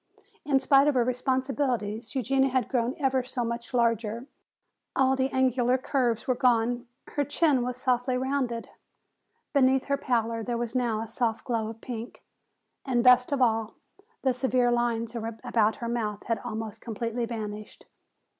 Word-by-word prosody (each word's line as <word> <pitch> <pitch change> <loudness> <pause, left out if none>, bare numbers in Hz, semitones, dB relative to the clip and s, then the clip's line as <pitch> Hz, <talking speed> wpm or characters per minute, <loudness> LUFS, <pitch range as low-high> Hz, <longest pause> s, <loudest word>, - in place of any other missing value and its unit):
In 280 -2 +2
spite 275 +1 +5
of 295 - +2
her 245 - +4
responsibilities 255 -3 -1
Eugenia 270 +1 +2
had 260 -1 0
grown 245 0 0
ever 265 -4 +1
so 250 0 -3
much 235 0 -4
larger; 230 -1 0 0.7
all 265 0 +3
the 265 0 0
angular 255 -1 +2
curves 245 -4 0
were 255 - +3
gone, 245 -1 +1 0.2
her 290 - 0
chin 290 -2 +2
was 250 0 -3
softly 250 0 +1
rounded. 255 -3 -1 0.9
Beneath 265 -2 +3
her 280 0 0
pallor 230 -4 0
there 240 +1 -2
was 235 -1 -3
now 235 -4 0
a 225 - -5
soft 230 +1 -1
glow 230 -3 -1
of 225 0 -8
pink, 235 -2 -7 0.6
and 245 -3 +1
best 250 +1 +6
of 275 -2 +2
all, 225 -2 +1 0.5
the 260 -1 +3
severe 255 -1 +2
lines 235 -1 0 0.3
about 220 -1 +2
her 235 - -5
mouth 220 -3 -2
had 230 -3 -1
almost 220 -1 -6
completely 230 +1 -3
vanished. 215 -2 -7
245 Hz, 155 wpm, -27 LUFS, 230-260 Hz, 0.9 s, best